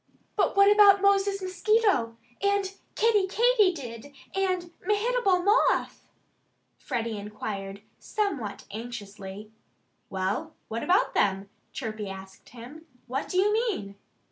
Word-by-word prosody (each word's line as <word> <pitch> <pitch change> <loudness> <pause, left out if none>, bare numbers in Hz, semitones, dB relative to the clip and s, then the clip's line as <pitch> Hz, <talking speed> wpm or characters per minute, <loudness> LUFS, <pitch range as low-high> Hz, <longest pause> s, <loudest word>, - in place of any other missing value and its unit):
"But - - +1
what 400 +1 +7
about 400 -1 +6
Moses 395 0 +2
Mosquito 375 - +1 0.2
and 400 -1 +1 0.2
Kiddie 425 -3 +3
Katydid 365 - +1 0.2
and 370 -3 -1
Mehitable 415 -2 +1
Moth?" 405 +3 +2 0.7
Freddie 230 -3 -3
inquired 200 -1 -6 0.2
somewhat 310 - -3
anxiously. 205 -2 -8 0.6
"Well, 195 +12 -3
what 230 +1 -3
about 365 +2 +2
them?" 195 0 +1 0.2
Chirpy 215 -5 -5
asked 190 0 -11
him. 255 +7 -12 0.2
"What 260 +3 -4
do 365 - -2
you 410 +3 +3
mean?" 430 - -1
335 Hz, 110 wpm, -27 LUFS, -, 0.7 s, what